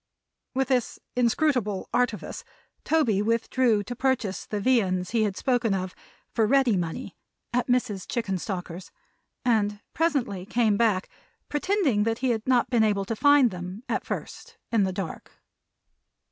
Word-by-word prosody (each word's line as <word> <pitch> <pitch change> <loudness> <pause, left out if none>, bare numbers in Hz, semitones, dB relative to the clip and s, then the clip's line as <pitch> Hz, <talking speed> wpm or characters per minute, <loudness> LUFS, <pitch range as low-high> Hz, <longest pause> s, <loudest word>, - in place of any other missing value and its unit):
With 265 0 +1
this 250 -3 +1 0.2
inscrutable 245 -4 +1
artifice, 245 -3 -1 0.4
Toby 245 -11 +2
withdrew 230 0 +2
to 245 +5 -6
purchase 255 -6 -1
the 210 - -2
viands 195 -7 +1
he 230 -1 +2
had 200 -2 -3
spoken 245 -5 +1
of, 185 -1 -3 0.4
for 225 -2 +2
ready 265 -3 +4
money, 175 +7 -4 0.4
at 245 0 +1
Mrs. 245 -6 0
Chickenstalker's; 190 -5 -4 0.6
and 210 -4 +2
presently 275 - 0
came 225 -2 +2
back, 205 -4 +2 0.4
pretending 295 - +1
that 225 +1 +1
he 255 0 +1
had 225 0 -3
not 250 -1 +3
been 235 -3 +4
able 205 -2 +1
to 225 - -3
find 285 -1 +5
them, 180 +4 -7
at - - -1
first - - -6
in 220 -4 +3
the 190 - -1
dark. 185 -2 -6
225 Hz, 145 wpm, -26 LUFS, 200-250 Hz, 0.6 s, find